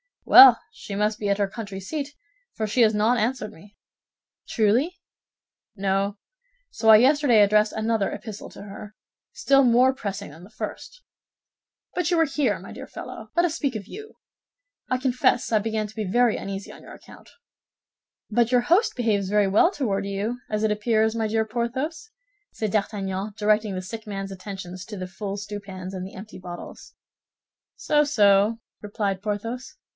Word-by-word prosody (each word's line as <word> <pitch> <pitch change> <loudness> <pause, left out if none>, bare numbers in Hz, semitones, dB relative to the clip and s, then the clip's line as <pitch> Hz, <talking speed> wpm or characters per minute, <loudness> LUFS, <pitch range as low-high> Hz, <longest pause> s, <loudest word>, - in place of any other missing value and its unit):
"Well, 260 -3 +9
she 200 - -8
must 210 +1 0
be 205 - -2
at 200 - +2
her 200 - +2
country 200 -2 -7
seat, 290 +8 -5 0.4
for 220 - -2
she 215 +4 +1
has 220 -1 +5
not 220 +4 +2
answered 230 0 -1
me." 205 +5 -18 0.7
"Truly?" 240 - +1 0.8
"No; 195 +1 -1 0.5
so 225 - 0
I 220 - +11
yesterday 260 -2 +4
addressed 210 +1 +3
another 220 -2 0
epistle 215 -2 -8
to - - -11
her, 205 +1 -10 0.4
still 275 0 +3
more 250 +2 +4
pressing 200 - -6
than 160 +4 -14
the 190 - -13
first. - - -8 0.9
But 360 -4 -1
you 345 - +2
are 325 - +5
here, 275 -6 0
my - - -11
dear - - -9
fellow, - - -9
let 345 0 +4
us 330 -2 -1
speak 280 -7 -2
of 205 -2 -6
you. 430 - -10 0.7
I 255 - +1
confess 250 -2 +1
I 220 - +4
began 220 0 -2
to 210 - -11
be 215 -2 -3
very 240 +4 +2
uneasy 195 0 -6
on - - -13
your - - -12
account." - - -15 1.0
"But 235 +2 +2
your 245 - +5
host 350 - +2
behaves 210 -6 0
very 210 -1 +3
well 215 - +5
toward 210 - -2
you, 205 +5 -3
as 215 0 -1
it 220 - +2
appears, 220 +1 +1
my 225 -1 -1
dear 220 +1 0
Porthos," 260 - -3 0.4
said 215 -2 -3
D'Artagnan, 200 -1 -2
directing 210 -1 +1
the 185 - -3
sick 220 +3 -8
man's 195 -1 -5
attention 190 -1 -8
to 210 - -7
the 185 -1 -5
full 195 +2 -5
stewpans 200 -2 -7
and 185 0 -5
the - - -13
empty 205 +1 -10
bottles. 175 -1 -10 0.8
"So, 295 0 +2
so," 210 -4 +3 0.2
replied 200 -2 -3
Porthos. 225 - -4
215 Hz, 170 wpm, -24 LUFS, 200-245 Hz, 1.0 s, I